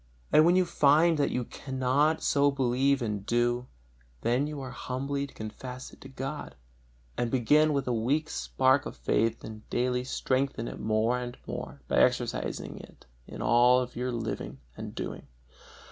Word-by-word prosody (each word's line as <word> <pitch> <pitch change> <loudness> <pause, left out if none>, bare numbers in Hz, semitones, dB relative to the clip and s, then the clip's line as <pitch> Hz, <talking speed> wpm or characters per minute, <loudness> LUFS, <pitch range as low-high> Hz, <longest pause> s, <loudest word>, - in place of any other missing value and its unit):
And 155 - +7
when 175 +1 +5
you 185 0 +4
find 155 +1 +4
that 145 - +2
you 125 - -1
cannot 135 +5 0
so 145 0 +3
believe 135 0 +1
and 105 -3 -3
do, 120 +2 0 0.5
then 125 +5 +1
you 150 -1 -5
are 130 -2 -6
humbly 140 +2 -3
to - - -17
confess 125 +4 -7
it - - -17
to 135 - -10
God, 135 - -6 0.6
and 120 - +1
so - - -6
begin 150 +5 +4
with 140 -3 -1
a 125 - +1
weak 135 +8 0
spark 130 +2 +1
of - - -9
faith 115 +1 0
and 110 0 -10
daily 125 0 0
strengthen 130 -2 -1
it - - -7
more 110 +3 +1
and 125 0 -6
more 70 - -6
by - - 0
exercising - - 0
it - - -15 0.2
in - - -6
all 125 +1 +5
your 125 +1 -2
living 110 - -4 0.2
and - - -7
doing. - - -5
130 Hz, 170 wpm, -29 LUFS, 120-140 Hz, 0.6 s, And